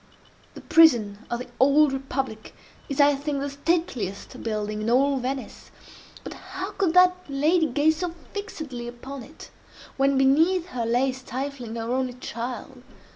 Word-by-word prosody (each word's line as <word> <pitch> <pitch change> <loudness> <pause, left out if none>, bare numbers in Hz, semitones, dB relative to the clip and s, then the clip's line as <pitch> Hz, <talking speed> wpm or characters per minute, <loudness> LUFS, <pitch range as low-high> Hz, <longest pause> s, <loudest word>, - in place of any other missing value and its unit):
The - - -9
prison 235 -11 +5
of 240 - -1
the - - -7
Old 280 +2 +5
Republic 270 -4 -4 0.3
is, 275 - -4
I 290 0 +6
think, 285 0 -2
the 280 0 -3
stateliest 280 - -2
building 215 -1 -3
in 215 - -1
all 275 +3 +3
Venice—but 260 +1 -8
how 380 +1 -6
could 375 -5 0
that 365 0 +6
lady 310 +4 +2
gaze 305 +2 +2
so 355 0 -2 0.2
fixedly 310 - -6
upon 255 +3 -8
it, 290 +7 -13 0.5
when 275 0 +3
beneath 325 +7 +3
her 235 -6 -3
lay 250 +3 +2
stifling 260 -2 -6
her 230 +1 -3
only 255 -1 -1
child? 250 +1 -6
270 Hz, 145 wpm, -25 LUFS, 245-310 Hz, 0.5 s, I